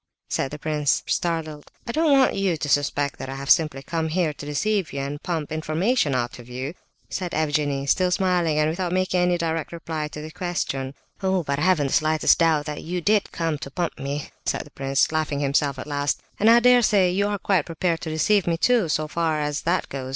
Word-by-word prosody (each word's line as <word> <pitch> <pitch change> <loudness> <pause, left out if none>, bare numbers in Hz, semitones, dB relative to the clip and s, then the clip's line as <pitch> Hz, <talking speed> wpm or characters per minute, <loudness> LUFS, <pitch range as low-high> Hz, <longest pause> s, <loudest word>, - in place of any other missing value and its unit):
said - - -1
the 150 - -7
prince, 150 -2 0
startled. 160 -3 -2 0.2
"I 235 - -3
don't 315 +3 +2
want 270 -2 +5
you 195 -4 0
to 150 - -3
suspect 145 0 0
that 130 - -6
I 135 - -5
have 135 -1 -1
simply 150 -4 +3
come 165 +2 -2
here 160 -1 0
to 145 - -9
deceive 195 +5 0
you 140 - -4
and 140 +2 -4
pump 160 -4 -3
information 160 - 0
out 120 0 -2
of 120 0 -12
you!" 130 +5 -5 0.3
said 180 -2 -4
Evgenie, 145 -3 0
still 180 +6 +2
smiling, 180 -4 +1
and 150 0 +3
without 175 +2 -2
making 185 0 +1
any 180 0 +2
direct 165 -1 -2
reply 160 -2 -4
to 150 - -9
the 155 +1 -7
question. 140 -7 -3 0.3
"Oh, 190 -2 +1
but 140 -1 -2
I - - -2
haven't 175 -4 +3
the 135 - -2
slightest 155 0 +3
doubt 160 -3 +3
that 150 -1 -5
you 180 +2 -3
did 205 +4 +1
come 165 -3 -2
to 140 - -7
pump 170 +4 -3
me," 140 +1 -4
said - - -1
the - - -17
prince, 135 +1 +1
laughing 155 -2 -1
himself, 140 -1 +1
at - - -6
last; 145 -1 -1 0.2
"and 215 - +5
I 235 +1 +7
dare 250 0 +6
say 195 -5 +3
you 200 +3 +1
are 205 0 -1
quite 190 -5 +1
prepared 165 0 -1
to 160 - -4
deceive 175 +5 +2
me 165 -1 +1
too, 230 -2 +2
so 155 0 0
far 160 -1 0
as 150 -1 -2
that 180 - +1
goes. 130 -1 -6
155 Hz, 225 wpm, -24 LUFS, 145-180 Hz, 0.3 s, I